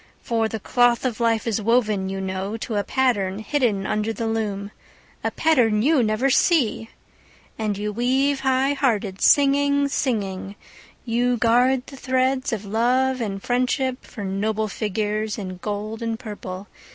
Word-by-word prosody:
For 225 -1 0
the 220 - -4
cloth 245 +3 +2
of 245 -3 -2
life 230 -2 +1
is 225 -2 -1
woven, 215 -4 +1
you 195 0 -4
know, 190 +3 -3
To 225 - -5
a 205 - +1
pattern 205 -6 0
hidden 220 -4 0
under 215 +1 -1
the 225 +1 -4
loom— 210 -3 -2 0.5
A - - +1
pattern 230 -9 +2
you 295 0 +4
never 225 +4 +1
see! 250 - +2 0.7
And 210 -2 -1
you 210 +1 -3
weave 265 +5 +1
high 265 +1 +2
hearted, 215 -8 -1
singing, 285 0 +4
singing, 200 -8 -2 0.5
You 245 +1 +1
guard 245 +3 +3
the 275 - -11
threads 260 0 0
of 215 -3 -3
love 250 +5 +1
and 195 -3 -4
friendship 255 +1 0
For 210 - -9
noble 210 +3 -1
figures 215 +1 -2
in 185 -3 -6
gold 210 +3 -5
and 230 -1 -2
purple. 205 -4 -7
225 Hz, 150 wpm, -23 LUFS, 210-255 Hz, 0.7 s, you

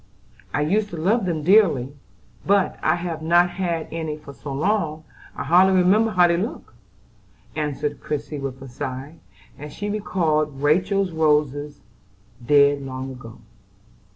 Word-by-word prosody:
"I 145 - -1
used 205 +7 +1
to 170 - -7
love 195 +7 +1
them 160 -3 -2
dearly; 160 - +4 0.5
but 200 -1 +1
I 155 - +2
have 170 -2 -5
not 175 +2 +3
had 175 -3 -2
any 160 -2 -4
for 150 -2 -12
so 140 - -8
long 155 0 -1 0.3
I - - -4
hardly 190 +3 +4
remember 205 +5 +4
how 180 -4 +4
they 170 0 +1
look," 215 - -5 0.8
answered 150 -1 -3
Christie 150 0 -4
with 135 -1 -5
a - - -9
sigh, 130 +5 -6 0.4
as 150 +1 -8
she 205 0 -4
recalled 155 -8 -1
Rachel's 185 +5 +2
roses, 150 -2 0 0.6
dead 140 +2 +4
long 130 0 -6
ago. 115 -3 -12
155 Hz, 145 wpm, -22 LUFS, 145-180 Hz, 0.8 s, dearly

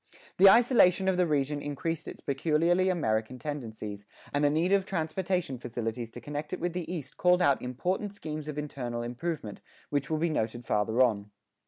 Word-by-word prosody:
The 195 +1 +9
isolation 200 -5 +5
of 190 -1 +2
the 180 -1 +3
region 145 -1 0
increased 145 +3 -3
its - - -8
peculiarly 165 +6 +2
American 115 -8 0
tendencies, 110 -7 -6 0.3
and 145 +1 +1
the 145 - +5
need 160 +5 +1
of 200 -1 +4
transportation 180 -5 -2
facilities 115 -1 -4
to - - -9
connect 150 +2 -5
it 185 - -3
with 175 0 -2
the 175 -2 -4
East 155 -7 -6
called 180 0 +4
out 140 -6 +3
important 180 - -2
schemes 155 -6 -6
of 150 -1 -5
internal 125 -5 -4
improvement, 125 -2 -4 0.3
which 145 -1 -1
will 160 - +1
be 165 +1 0
noted 120 -3 -2
farther 110 +4 +2
on. 105 -4 0
150 Hz, 180 wpm, -29 LUFS, 125-175 Hz, 0.3 s, The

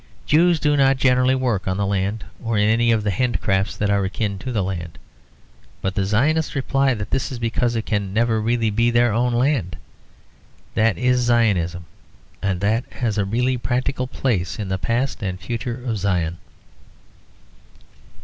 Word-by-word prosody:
Jews 170 +2 +4
do 150 -1 +2
not 135 -1 +4
generally 130 0 +3
work 120 -8 -1
on 95 0 0
the 100 - 0
land, 100 0 -1 0.2
or 115 -2 -1
in 105 0 +3
any 115 +2 +3
of 110 -2 +1
the 105 - 0
handicrafts 100 -3 0
that 105 -1 0
are 100 -1 +2
akin 100 +1 -2
to 130 - -5
the 105 -5 0
land; 85 -3 -5 0.8
but 95 - -2
the 100 -1 0
Zionists 150 +11 +1
reply 135 -1 +1
that 105 -1 -6
this 135 0 -1
is 130 - -4
because 120 +1 0
it 115 - -2
can 100 -3 -1
never 110 +1 +1
really 115 0 +1
be 115 +3 +2
their 120 -1 +3
own 120 +2 +1
land. 120 - 0 1.0
That 110 -1 +2
is 125 0 +2
Zionism, 100 -8 +1 0.6
and 95 -2 -1
that 110 +4 +1
has 110 -4 -1
really 120 +6 +1
a 125 - -3
practical 130 +1 -1
place 100 -9 -1
in 100 -3 -4
the 95 0 -1
past 120 +8 -1
and 95 -3 -3
future 120 +4 -4
of 115 -4 -2
Zion. 85 -4 -1
115 Hz, 175 wpm, -21 LUFS, 100-125 Hz, 1.0 s, Jews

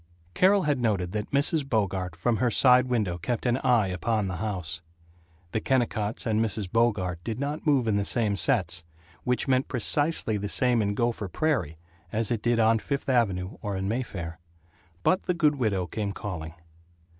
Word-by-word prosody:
Carol 190 - +4
had 145 -3 +1
noted 100 -6 0
that 105 0 -3
Mrs. 145 +2 +2
Bogart 95 -6 -1
from 115 +7 0
her 125 +1 +2
side 125 +2 +5
window 105 -8 -1
kept 120 +8 -3
an 120 0 +2
eye 125 -5 +3
upon 105 +3 -1
the 95 -2 -4
house. 90 -3 -3 0.7
The 110 - 0
Kennicotts 115 -5 0
and 110 0 +2
Mrs. 105 -4 -3
Bogart 95 -7 +1
did 115 0 -4
not 145 +3 -3
move 135 -5 +3
in 105 -2 +2
the 100 - +1
same 105 -1 +1
sets 90 - +1 0.4
which 125 +2 0
meant 130 0 +2
precisely 145 -2 0
the 100 0 -4
same 125 -2 +3
in 100 -1 -1
Gopher 115 -2 -1
Prairie 90 - -1 0.3
as 110 +1 -1
it 115 -3 0
did 120 +1 +1
on 110 0 +4
Fifth 140 +3 -3
Avenue 100 -7 0
or 100 -3 -3
in 95 0 -2
Mayfair. 95 -8 -4 0.6
But 185 - +2
the 180 - +1
good 150 -3 +2
widow 100 -7 0
came 100 +3 -3
calling. 85 -6 -6
110 Hz, 180 wpm, -27 LUFS, 95-125 Hz, 0.7 s, side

